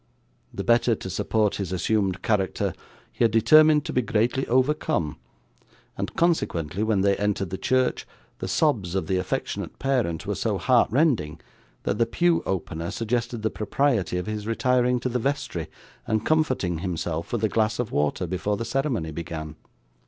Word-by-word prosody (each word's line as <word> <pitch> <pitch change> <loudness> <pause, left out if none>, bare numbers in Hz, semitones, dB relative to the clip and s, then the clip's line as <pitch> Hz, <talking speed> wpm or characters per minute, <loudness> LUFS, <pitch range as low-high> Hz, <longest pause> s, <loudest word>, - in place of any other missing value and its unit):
The - - -5
better 120 0 +3
to 95 - -7
support 105 +1 0
his 95 -3 -4
assumed 95 0 0
character 100 -4 0 0.4
he - - -1
had 115 - +5
determined 150 +7 +5
to - - -4
be 125 - +2
greatly 120 +4 0
overcome, 130 - +1 0.8
and, - - -4
consequently, 100 - 0
when 110 -3 +2
they 100 0 +3
entered 100 -3 -1
the 95 - -3
church, 130 0 +1 0.3
the - - -4
sobs 105 - +1
of 95 - 0
the 95 - 0
affectionate 90 - -3
parent 125 -12 -1
were - - -1
so - - -1
heart - - +3
rending 115 - +1 0.4
that 105 - -1
the 115 - +3
pew 170 -1 +2
opener 85 -3 -3
suggested 115 0 -2
the 110 - +1
propriety 110 -4 0
of 90 - -3
his 105 0 -4
retiring 125 +1 +2
to 130 - -1
the 125 0 -1
vestry, 125 - -2 0.4
and 110 0 0
comforting 130 - +1
himself 85 -2 -3
with 115 -2 -2
a 110 - +3
glass 110 +1 +1
of 120 -3 -2
water 75 +5 0
before 95 +4 -2
the 115 - -3
ceremony 130 - -1
began. 80 -1 -6
110 Hz, 165 wpm, -25 LUFS, 90-125 Hz, 0.8 s, had